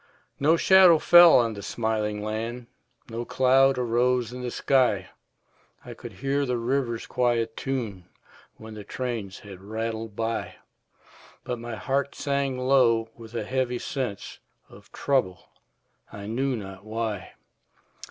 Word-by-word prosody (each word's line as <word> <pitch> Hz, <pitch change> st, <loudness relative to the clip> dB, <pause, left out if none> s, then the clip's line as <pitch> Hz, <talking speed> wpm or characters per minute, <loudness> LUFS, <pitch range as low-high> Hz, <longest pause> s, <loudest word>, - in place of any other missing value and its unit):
No 155 Hz, +4 st, +4 dB
shadow 185 Hz, -2 st, +7 dB
fell 175 Hz, +1 st, +8 dB
on 115 Hz, -2 st, +2 dB
the 100 Hz, -, -8 dB
smiling 105 Hz, -1 st, -2 dB
land, 115 Hz, +3 st, -4 dB, 0.5 s
No 115 Hz, +1 st, -3 dB
cloud 135 Hz, +2 st, +3 dB
arose 125 Hz, 0 st, +1 dB
in 125 Hz, -, -7 dB
the 125 Hz, -, -3 dB
sky; 120 Hz, -7 st, +1 dB, 0.7 s
I -, -, -8 dB
could -, -, -10 dB
hear 140 Hz, +1 st, -1 dB
the 125 Hz, -3 st, -1 dB
river's 120 Hz, -1 st, -1 dB
quiet 120 Hz, -3 st, 0 dB
tune 115 Hz, -9 st, -4 dB, 0.5 s
When 110 Hz, 0 st, -10 dB
the 105 Hz, -1 st, -8 dB
trains 115 Hz, -4 st, -5 dB
had 95 Hz, -3 st, -11 dB
rattled 110 Hz, +1 st, -5 dB
by; 115 Hz, +1 st, -3 dB, 0.9 s
But 125 Hz, -1 st, -4 dB
my 120 Hz, 0 st, -6 dB
heart 140 Hz, +4 st, -2 dB
sank 140 Hz, -2 st, -1 dB
low 125 Hz, -4 st, +3 dB
with 115 Hz, 0 st, -12 dB
a -, -, -2 dB
heavy 130 Hz, -1 st, -1 dB
sense 125 Hz, -7 st, -5 dB, 0.3 s
Of -, -, -17 dB
trouble, 125 Hz, -11 st, -1 dB, 0.6 s
I 100 Hz, -1 st, -8 dB
knew 130 Hz, +5 st, -1 dB
not 95 Hz, -3 st, -8 dB
why. 110 Hz, -2 st, -4 dB
120 Hz, 135 wpm, -26 LUFS, 110-130 Hz, 0.9 s, fell